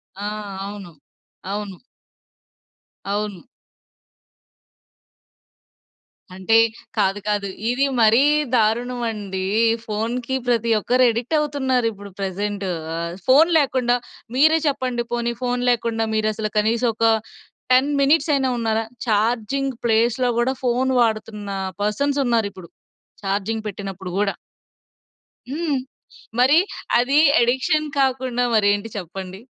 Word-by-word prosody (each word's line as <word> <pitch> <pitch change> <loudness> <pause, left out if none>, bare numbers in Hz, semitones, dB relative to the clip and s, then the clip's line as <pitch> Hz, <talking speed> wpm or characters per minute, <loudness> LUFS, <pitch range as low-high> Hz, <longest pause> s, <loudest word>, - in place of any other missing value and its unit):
ఆ! 200 - -7 0.4
అవును. 200 -3 -8 0.6
అవును. 200 -2 -5 1.3
అవును. 205 -3 -2 2.9
అంటే 190 +4 +3 0.4
కాదు, 195 0 +1
కాదు 205 -1 0 0.2
ఇది 255 +3 +2 0.2
మరీ 225 +3 +5 0.3
దారుణమండి. 225 -4 -1 0.4
ఫోన్‌కి 230 +4 -2
ప్రతి 235 -1 +1
ఒక్కరు 250 +4 +2
అడిక్టవుతున్నారు 265 0 0
ఇప్పుడు 200 -1 -11
ప్రెజెంటు. 200 +1 -3 0.3
ఆ - - -3 0.3
ఫోన్ 290 +6 +6
లేకుండా 255 -4 +1 0.4
మీరే 315 +4 +5
చెప్పండి 255 -4 -1
పోనీ 235 0 -1
ఫోన్ 245 0 -1
లేకుండా 230 -2 0
మీరసలు 215 0 -1
కనీసం 225 +3 +2
ఒక 230 - +1 0.7
10 260 +3 +4
మినిట్సయినా 280 -1 +3
ఉన్నారా? 225 -1 0 0.2
చార్జింగ్ 235 +5 0
ప్లేస్‌లో 235 +2 +2
గూడా, 250 +2 +1
ఫోన్ 250 +1 +1
వాడుతున్న 215 -2 -1 0.3
పర్సన్స్ 275 +8 0
ఉన్నారిప్పుడు. 205 -7 -1 0.6
చార్జింగ్ 205 +3 -2
పెట్టినప్పుడు 195 -2 -6
గూడా. 200 -1 0 1.1
హ్మ్. 300 0 -1 0.6
మరి 265 +5 +5 0.4
అది 265 +4 +2 0.2
ఎడిక్షన్ 260 +6 +1
కాకుండా 255 -2 +1
మరేంటి 205 +1 +2
చెప్పండి? 190 +1 -7
230 Hz, 95 wpm, -21 LUFS, 205-255 Hz, 2.9 s, ఫోన్